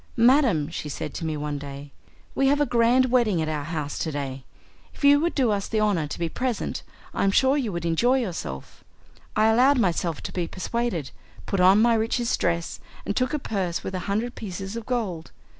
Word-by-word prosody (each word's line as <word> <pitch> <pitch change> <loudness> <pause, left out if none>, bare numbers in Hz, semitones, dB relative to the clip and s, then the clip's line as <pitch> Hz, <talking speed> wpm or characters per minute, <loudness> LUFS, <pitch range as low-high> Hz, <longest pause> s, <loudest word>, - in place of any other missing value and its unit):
'Madam,' 235 - +4
she 155 -2 -5
said 150 +1 -5
to - - -5
me 155 -1 -2
one 145 -1 -3
day, 140 0 -9 0.4
'we 270 - +2
have 285 +1 +3
a 290 - +3
grand 245 +1 +3
wedding 230 -8 +3
at 160 - -1
our 150 -2 -3
house 150 -3 -4
to 160 - -2
day. 135 -2 -5 0.5
If - - -13
you 285 0 +7
would 340 +3 -1
do 255 -6 +2
us 200 -1 -1
the 220 - -1
honour 200 -8 +1
to - - -6
be 170 - -1
present, 250 +6 -3 0.3
I - - -1
am 195 - +4
sure 265 +7 +3
you 255 -7 -1
would 170 -2 -4
enjoy 235 +11 +3
yourself.' 175 - -5 0.5
I 215 - +4
allowed 250 +6 +5
myself 170 -7 0
to - - -5
be 175 -2 -2
persuaded, 190 - -3 0.3
put 195 - -2
on 190 +4 +6
my 235 0 +4
richest 230 +2 0
dress, 170 0 -1 0.3
and 200 - -2
took 255 - +1
a 300 - 0
purse 190 - -3
with 190 - -5
a 185 - -2
hundred 225 +5 -1
pieces 195 0 -6
of 230 -1 -6
gold. 200 -10 -2
200 Hz, 210 wpm, -25 LUFS, 165-240 Hz, 0.5 s, you